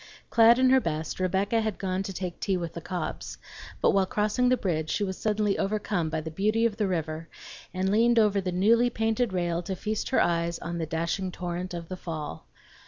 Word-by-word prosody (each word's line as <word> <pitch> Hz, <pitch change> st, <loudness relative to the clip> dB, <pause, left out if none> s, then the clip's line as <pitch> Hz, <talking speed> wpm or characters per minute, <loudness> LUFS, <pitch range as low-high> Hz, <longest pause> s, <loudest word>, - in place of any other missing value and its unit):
Clad 230 Hz, +1 st, +7 dB
in 260 Hz, 0 st, +4 dB
her 265 Hz, -, +6 dB
best, 155 Hz, -2 st, -3 dB
Rebecca 195 Hz, +5 st, +1 dB
had 220 Hz, -2 st, -2 dB
gone 185 Hz, -1 st, -2 dB
to 195 Hz, -, -4 dB
take 180 Hz, -2 st, -5 dB
tea 195 Hz, -2 st, 0 dB
with 170 Hz, -2 st, -4 dB
the 170 Hz, -, -6 dB
Cobbs; 180 Hz, -2 st, -5 dB, 0.4 s
but -, -, +5 dB
while 195 Hz, -1 st, +2 dB
crossing 215 Hz, +5 st, +1 dB
the 255 Hz, -, +3 dB
bridge 160 Hz, -7 st, -1 dB
she 210 Hz, -, 0 dB
was 190 Hz, -1 st, -2 dB
suddenly 210 Hz, -1 st, 0 dB
overcome 200 Hz, -4 st, -1 dB
by 160 Hz, 0 st, -2 dB
the 160 Hz, +1 st, -6 dB
beauty 215 Hz, +7 st, +1 dB
of 215 Hz, -3 st, 0 dB
the 210 Hz, -3 st, +1 dB
river 160 Hz, -2 st, -3 dB, 0.4 s
and 185 Hz, +1 st, -1 dB
leaned 235 Hz, +3 st, +4 dB
over 210 Hz, -3 st, +4 dB
the 185 Hz, -1 st, -2 dB
newly 230 Hz, +7 st, +4 dB
painted 225 Hz, 0 st, 0 dB
rail 175 Hz, -2 st, -1 dB
to 190 Hz, +2 st, -4 dB
feast 215 Hz, +3 st, -3 dB
her 260 Hz, -, +3 dB
eyes 170 Hz, 0 st, +1 dB
on 170 Hz, 0 st, -5 dB
the 160 Hz, -, -2 dB
dashing 170 Hz, +4 st, -2 dB
torrent 180 Hz, 0 st, -4 dB
of 170 Hz, -1 st, -6 dB
the 185 Hz, -, -6 dB
fall. 155 Hz, -, -6 dB
190 Hz, 215 wpm, -27 LUFS, 170-215 Hz, 0.4 s, Clad